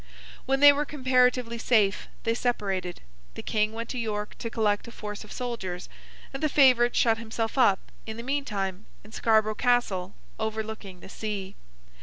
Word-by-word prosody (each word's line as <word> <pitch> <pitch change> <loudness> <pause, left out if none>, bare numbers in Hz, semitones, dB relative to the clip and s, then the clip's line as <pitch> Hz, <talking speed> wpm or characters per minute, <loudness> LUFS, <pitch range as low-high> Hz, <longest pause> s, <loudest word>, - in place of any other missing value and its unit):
When 270 +1 +1
they 290 0 +10
were 290 +1 0
comparatively 250 -4 +1
safe, 210 -5 +2 0.2
they 230 - +1
separated; 195 -7 -2 0.3
the - - -7
King 215 0 +1
went 230 +1 -5
to 250 - -3
York 210 -2 -3
to 230 - -4
collect 215 -2 0
a - - -9
force 210 -1 -7
of 210 - -14
soldiers; 210 -8 -5 0.4
and 270 - -5
the 310 - +2
favourite 255 -4 +5
shut 225 -1 +3
himself 225 0 -3
up, 205 -8 +3 0.2
in 220 0 -5
the 235 - -6
meantime, 210 -8 -3 0.2
in 215 - -15
Scarborough 220 -1 +2
Castle 210 -6 0 0.2
overlooking 220 -4 -4
the - - -11
sea. 200 -2 -5
225 Hz, 165 wpm, -27 LUFS, 210-245 Hz, 0.4 s, they